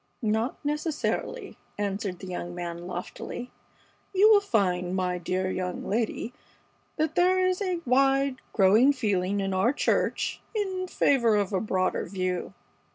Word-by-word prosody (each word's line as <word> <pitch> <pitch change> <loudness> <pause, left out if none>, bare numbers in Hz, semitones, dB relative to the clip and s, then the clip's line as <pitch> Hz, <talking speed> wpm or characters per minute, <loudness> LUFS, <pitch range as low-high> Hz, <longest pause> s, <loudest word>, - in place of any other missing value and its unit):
"Not 220 +7 -1
necessarily," 300 +10 -2 0.2
answered 200 -2 -2
the 190 - -9
young 175 -1 -5
man, 175 0 -5
loftily. 185 +7 -6 0.6
"You 415 +3 +7
will 410 -2 +7
find, 185 - 0
my 180 -1 -1
dear 185 +2 -1
young 180 -1 -3
lady, 225 +2 -1 0.6
that 315 0 0
there 370 +2 +3
is 370 +2 0
a 365 -3 -1
wide, 270 +1 +3
growing 220 +7 +5
feeling 200 -6 0
in 195 -1 -1
our 190 +6 +3
church - - 0
in 380 -3 -1
favor 240 -10 +3
of 205 -1 0
a 190 - +1
broader 185 -3 0
view. 185 0 -3
215 Hz, 140 wpm, -27 LUFS, 185-285 Hz, 0.6 s, You